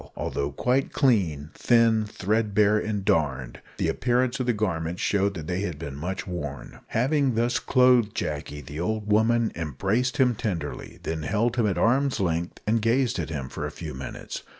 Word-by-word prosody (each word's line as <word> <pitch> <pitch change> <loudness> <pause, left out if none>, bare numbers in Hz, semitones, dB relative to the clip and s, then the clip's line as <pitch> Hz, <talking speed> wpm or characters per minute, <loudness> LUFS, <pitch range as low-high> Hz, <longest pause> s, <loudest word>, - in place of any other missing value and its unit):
Although 70 0 -2
quite 130 - +1
clean, 85 - +1
thin, 115 -2 +3
threadbare, 105 0 +2
and 105 -2 -3
darned, 65 -8 0 0.2
the - - 0
appearance 125 +9 +1
of 130 - -1
the - - +4
garments 90 -5 -2
showed 100 0 +1
that 80 -3 -6
they 90 +3 -2
had 90 -7 -3
been 70 -3 -6
much 90 +6 -4
worn. 75 -7 -6
Having 135 +1 +1
thus 120 +2 +1
clothed 125 -4 +4
Jacky, 75 0 -4
the 75 +3 -8
old 105 +3 -2
woman 115 +2 +3
embraced 95 - -1
him 125 -2 +4
tenderly, 95 -9 -4
then 80 -1 -3
held 110 +8 0
him 115 -3 +3
at 95 - -1
arm's 135 +4 +2
length 85 -2 -1
and 110 +1 +2
gazed 120 -1 +1
at 80 - -3
him 70 -5 -4
for - - -4
a - - -5
few - - -7
minutes. 65 +1 -7
105 Hz, 175 wpm, -26 LUFS, 80-120 Hz, 0.2 s, the